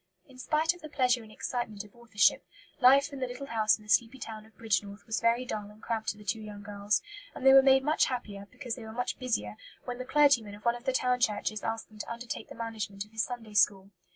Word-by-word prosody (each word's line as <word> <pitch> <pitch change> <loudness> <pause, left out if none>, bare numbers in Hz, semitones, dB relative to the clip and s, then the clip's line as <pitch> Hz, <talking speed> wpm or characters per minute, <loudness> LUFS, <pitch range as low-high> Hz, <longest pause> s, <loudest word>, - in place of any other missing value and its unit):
In 260 -2 -16
spite 310 +5 +1
of 355 - -16
the 310 - -8
pleasure 250 -4 +2
and 220 -1 -14
excitement 215 -2 -4
of 210 +1 -18
authorship, 230 -3 +2 0.4
life 275 +3 +6
in 275 - -6
the 255 - -1
little 250 +3 -7
house 220 -4 +2
in 215 - -18
the - - -18
sleepy 235 +3 +3
town 220 -3 -8
of 220 - -25
Bridgnorth 205 -2 -2
was 220 - -2
very 235 +2 +2
dull 210 -4 -5
and 210 +1 -16
cramped 220 -1 -2
to 210 - -3
the 210 - -13
two 210 +3 -1
young 210 -1 -9
girls; 205 0 -1 0.3
and 265 - -6
they 265 - +9
were 270 - +10
made 265 0 +5
much 305 +3 +3
happier, 205 -6 -5
because 250 -5 -6
they 245 - -7
were 220 0 -8
much 245 +2 -3
busier, 105 - -2 0.3
when 245 0 -5
the - - -3
clergyman 265 -8 +3
of 210 - -16
one 235 - +4
of 240 +1 -11
the 265 - +2
town 250 -1 +1
churches 215 -2 0
asked 225 0 -3
them 215 -1 -16
to 210 - -5
undertake 235 +1 -6
the - - -9
management 215 -3 -5
of 210 - -23
his 220 0 -1
Sunday 230 -3 -5
school. 200 -1 +3
230 Hz, 255 wpm, -30 LUFS, 210-255 Hz, 0.4 s, were